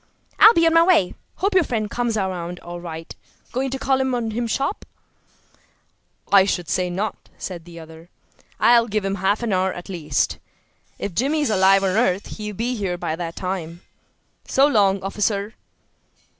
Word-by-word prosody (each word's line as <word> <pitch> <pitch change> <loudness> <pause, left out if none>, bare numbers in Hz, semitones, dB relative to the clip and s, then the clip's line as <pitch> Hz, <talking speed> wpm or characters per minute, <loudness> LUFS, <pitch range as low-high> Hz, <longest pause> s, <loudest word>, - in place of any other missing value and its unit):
"I'll 440 +2 +9
be 330 - +4
on 325 - +4
my 330 - +6
way. 335 - +3 0.2
Hope 395 +2 -1
your 370 -2 +5
friend 225 -7 -2
comes 235 0 -2
around 180 -3 -3
all 175 0 -8
right. 165 -1 -7 0.4
Going 265 +2 -1
to 270 - -3
call 265 0 +1
time 265 -1 0
on 230 -2 -2
him 235 +2 -2
sharp?" 275 - -2 1.5
"I 200 -1 +7
should 180 -3 -2
say 180 -1 0
not!" 195 +4 -4
said 175 -3 -7
the 170 -1 -11
other. 160 +1 -13 0.5
"I'll 235 -1 +5
give 210 -2 -2
him 195 - -1
half 200 +4 +1
an 225 -4 0
hour 185 0 +1
at 175 - -9
least. 155 -7 -1 0.6
If 200 - -5
Jimmy 280 - 0
is 290 - 0
alive 195 0 +4
on 190 - +2
earth 195 -2 +1
he'll 210 -1 -6
be 235 +5 -1
here 190 -5 -2
by 160 - -3
that 165 0 -5
time. 175 -2 -5 0.7
So 270 - +4
long, 200 -8 +2
officer." 200 +1 -1
200 Hz, 180 wpm, -22 LUFS, 180-240 Hz, 1.5 s, I'll